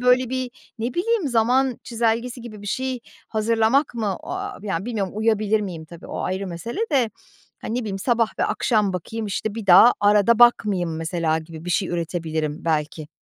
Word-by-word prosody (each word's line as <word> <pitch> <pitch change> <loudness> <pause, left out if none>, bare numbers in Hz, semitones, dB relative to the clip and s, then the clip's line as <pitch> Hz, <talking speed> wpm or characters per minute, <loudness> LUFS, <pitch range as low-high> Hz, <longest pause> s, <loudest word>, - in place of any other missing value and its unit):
böyle, 250 0 +3
bir, 255 -1 -2 0.3
ne 235 +2 -3
bileyim, 385 -3 +1
zaman 250 +2 +2
çizelgesi 235 +1 -1
gibi 215 -3 -10
bir - - -9
şey 260 +3 -2 0.3
hazırlamak 225 +5 +2
mı? 210 -5 -1
O - - -8
aaa, 395 +2 -4
yani, 195 -2 -2
bilmiyorum 210 -6 -2
uyabilir 215 -1 +2
miyim 175 -6 -5
tabii, 170 +1 -12
o - - -5
ayrı 190 +1 -2
mesele 185 - -5
de, 245 -5 +3 0.5
hani, 225 - -4
ne - - 0
bileyim, 200 -4 -4
sabah 230 +1 +2
ve - - +2
akşam 210 -5 +1
bakayım, 215 +5 -4
işte, 205 +2 -3
bir 225 -3 -6
daha 190 +7 +8
arada 210 +2 +4
bakmayayım 200 -8 +4
mesela 165 0 0
gibi 160 0 -10
bir 180 - -4
şey 185 +2 +1
üretebilirim 160 -2 -3
belki. 155 -1 -1
215 Hz, 180 wpm, -23 LUFS, 175-240 Hz, 0.5 s, daha